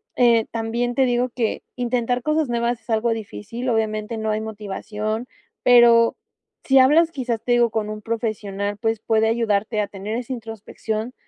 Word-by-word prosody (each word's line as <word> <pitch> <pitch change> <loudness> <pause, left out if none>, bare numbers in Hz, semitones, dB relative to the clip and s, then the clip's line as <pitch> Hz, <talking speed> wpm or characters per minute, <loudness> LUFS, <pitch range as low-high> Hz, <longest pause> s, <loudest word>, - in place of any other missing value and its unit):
eh, 235 -2 +4
también 235 +2 -2
te 270 - +3
digo 245 0 +1
que 235 -2 -2
intentar 245 0 -1
cosas 305 +3 +1
nuevas 235 0 0
es 230 - -32
algo 225 +1 +1
difícil. 225 +2 -5
Obviamente, 220 0 -1
no 220 0 -2
hay 215 - 0
motivación, 215 +1 -4 0.4
pero 235 -1 +6 0.5
sí 270 - +3
hablas, 310 +6 +5
quizás 245 -6 -3
te 245 - +1
digo 240 -1 +4
con 215 -1 -2
un 215 0 -6
profesional, 205 -3 -3
pues 225 0 -1
puede 220 0 +2
ayudarte 215 -1 0
a 205 - -2
tener 205 +2 -5
esa 250 +1 -6
introspección 225 0 -5
230 Hz, 165 wpm, -22 LUFS, 215-245 Hz, 0.5 s, pero